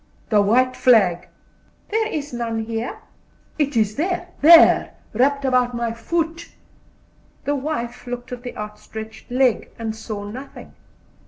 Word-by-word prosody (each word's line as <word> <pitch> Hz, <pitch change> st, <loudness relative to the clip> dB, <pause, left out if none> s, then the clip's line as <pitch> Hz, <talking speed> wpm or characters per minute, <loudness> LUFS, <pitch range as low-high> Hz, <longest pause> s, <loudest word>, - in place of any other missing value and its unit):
"The 210 Hz, -2 st, +4 dB
white 255 Hz, +5 st, +3 dB
flag." 195 Hz, -8 st, +3 dB, 0.6 s
"There 440 Hz, +1 st, +1 dB
is 295 Hz, -, -4 dB
none 230 Hz, -2 st, -2 dB
here." 230 Hz, -, -4 dB, 0.6 s
"It 285 Hz, -4 st, 0 dB
is 215 Hz, -1 st, +1 dB
there 355 Hz, +2 st, -1 dB
there, 330 Hz, +3 st, +7 dB, 0.2 s
wrapped 275 Hz, +4 st, +2 dB
about 250 Hz, -2 st, +2 dB
my 235 Hz, -1 st, -2 dB
foot." 330 Hz, +7 st, -3 dB, 1.0 s
The 285 Hz, -, +1 dB
wife 260 Hz, -4 st, -4 dB
looked 245 Hz, 0 st, -6 dB
at 250 Hz, -1 st, -6 dB
the 245 Hz, 0 st, -8 dB
outstretched 220 Hz, +1 st, -8 dB
leg, 250 Hz, -1 st, +1 dB
and 225 Hz, -1 st, -4 dB
saw 215 Hz, -2 st, -6 dB
nothing. 250 Hz, +7 st, -9 dB
245 Hz, 135 wpm, -21 LUFS, 225-285 Hz, 1.0 s, there